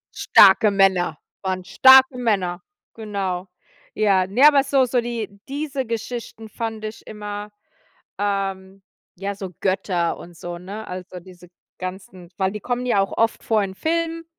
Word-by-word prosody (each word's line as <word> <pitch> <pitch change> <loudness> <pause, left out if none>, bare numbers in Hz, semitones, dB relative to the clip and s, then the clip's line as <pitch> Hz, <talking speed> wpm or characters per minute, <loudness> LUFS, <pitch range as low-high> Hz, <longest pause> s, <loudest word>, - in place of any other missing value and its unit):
Starke 200 +2 +6
Männer 190 -5 +2 0.2
waren 185 -1 -3
starke 260 +3 +6
Männer, 195 -7 -1 0.3
genau. 195 -4 -4 0.5
Ja, 195 -3 +2
ne, 245 +10 +6
aber 285 -2 +5
so 270 -1 +2
so 245 0 0
die 225 -4 -5
diese 280 -2 -3
Geschichten 230 -1 -6
fand 225 0 -5
ich 215 +1 -8
immer 210 -1 -7 0.7
ähm, 195 -1 -3 0.3
ja, 200 +2 -4
so 195 -2 -7
Götter 185 -3 0
und 175 -1 -12
so, 175 +1 -7
ne? 200 +5 -8
Also, 180 0 -8
diese 180 -1 -16 0.3
ganzen 185 -1 -8
weil 190 -1 0
die 210 - -6
kommen 245 +3 -3
ja 240 -5 +2
auch 195 - -2
oft 225 0 +1
vor 220 -2 +1
in 190 -1 -4
Filmen 330 +4 -2
200 Hz, 150 wpm, -22 LUFS, 190-230 Hz, 0.7 s, Starke